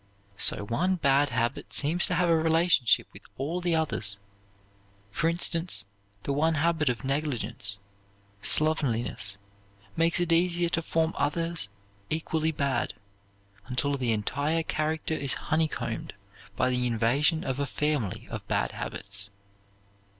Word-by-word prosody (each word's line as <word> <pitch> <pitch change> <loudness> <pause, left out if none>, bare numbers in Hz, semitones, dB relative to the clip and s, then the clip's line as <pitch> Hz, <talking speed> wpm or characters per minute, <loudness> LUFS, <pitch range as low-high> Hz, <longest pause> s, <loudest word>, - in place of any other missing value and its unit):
So 105 - +3
one 180 - +1
bad 145 -3 +3
habit 120 +1 -2
seems 160 +5 +3
to 180 - 0
have 180 +1 +2
a 165 - +4
relationship 160 -5 +3
with - - -10 0.2
all 160 +7 -2
the 175 -1 +1
others. 110 -11 0 0.9
For 165 +10 +1
instance, 170 - +3 0.4
the 140 - -1
one 160 +3 +2
habit 160 -1 +1
of 120 -2 -3
negligence, 125 -7 -1 0.6
slovenliness, 120 -10 +1 0.6
makes 165 +2 +3
it 175 -1 0
easier 170 0 +3
to 165 - 0
form 160 0 0
others 165 -3 -1 0.4
equally 160 0 0
bad, 140 -3 -1 0.7
until 140 +3 0
the 125 -4 0
entire 140 +9 0
character 155 +1 -2
is 140 -3 +2
honeycombed 160 0 -2 0.4
by 130 0 +1
the 125 0 +1
invasion 125 +8 +2
of 130 0 -3
a 140 - -1
family 140 -7 -2
of - - -6
bad - - 0
habits. 100 0 -5
150 Hz, 130 wpm, -27 LUFS, 125-165 Hz, 0.9 s, a